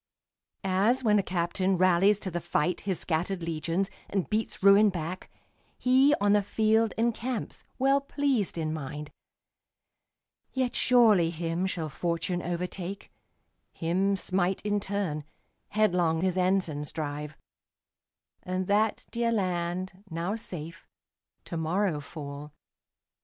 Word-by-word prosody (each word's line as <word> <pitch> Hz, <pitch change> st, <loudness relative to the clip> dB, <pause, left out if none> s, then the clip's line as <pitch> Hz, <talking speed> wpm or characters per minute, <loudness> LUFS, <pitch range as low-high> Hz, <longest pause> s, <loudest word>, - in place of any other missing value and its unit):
As 200 Hz, +7 st, +2 dB
when 210 Hz, -2 st, +4 dB
a -, -, +3 dB
captain 185 Hz, +1 st, 0 dB
rallies 185 Hz, +3 st, +4 dB
to 190 Hz, -, -3 dB
the 175 Hz, 0 st, -3 dB
fight 170 Hz, +1 st, 0 dB
His 185 Hz, -, 0 dB
scattered 175 Hz, +2 st, -1 dB
legions, 165 Hz, +3 st, -1 dB, 0.2 s
and 195 Hz, -3 st, -1 dB
beats 215 Hz, -2 st, -1 dB
ruin 200 Hz, +2 st, +7 dB
back, 175 Hz, 0 st, -5 dB, 0.5 s
He, 265 Hz, +3 st, +4 dB
on 205 Hz, 0 st, +3 dB
the 210 Hz, -, +4 dB
field, 220 Hz, +2 st, +2 dB
encamps, 235 Hz, +1 st, -2 dB
well 275 Hz, +2 st, +3 dB
pleased 275 Hz, -9 st, 0 dB
in 155 Hz, -1 st, -1 dB
mind. 150 Hz, 0 st, -6 dB, 1.4 s
Yet 260 Hz, -2 st, -1 dB
surely 220 Hz, -9 st, +5 dB
him 170 Hz, +2 st, -2 dB
shall 165 Hz, -4 st, -2 dB
fortune 170 Hz, +4 st, -2 dB
overtake, 180 Hz, +2 st, -4 dB, 0.6 s
Him 190 Hz, +4 st, +1 dB
smite 185 Hz, 0 st, -1 dB
in 205 Hz, 0 st, +1 dB
turn, 195 Hz, -7 st, -2 dB, 0.5 s
headlong 180 Hz, -6 st, +2 dB
his 185 Hz, -1 st, +1 dB
ensigns 180 Hz, -6 st, 0 dB
drive; 150 Hz, -1 st, -5 dB, 1.0 s
And 185 Hz, +1 st, -2 dB
that 210 Hz, +3 st, +1 dB
dear 235 Hz, 0 st, 0 dB
land, 185 Hz, -2 st, -2 dB
now 170 Hz, +5 st, -2 dB
safe, 165 Hz, -6 st, -8 dB, 0.6 s
to 170 Hz, -, -5 dB
morrow 165 Hz, +1 st, 0 dB
fall. 145 Hz, 0 st, -8 dB
185 Hz, 120 wpm, -28 LUFS, 165-210 Hz, 1.4 s, ruin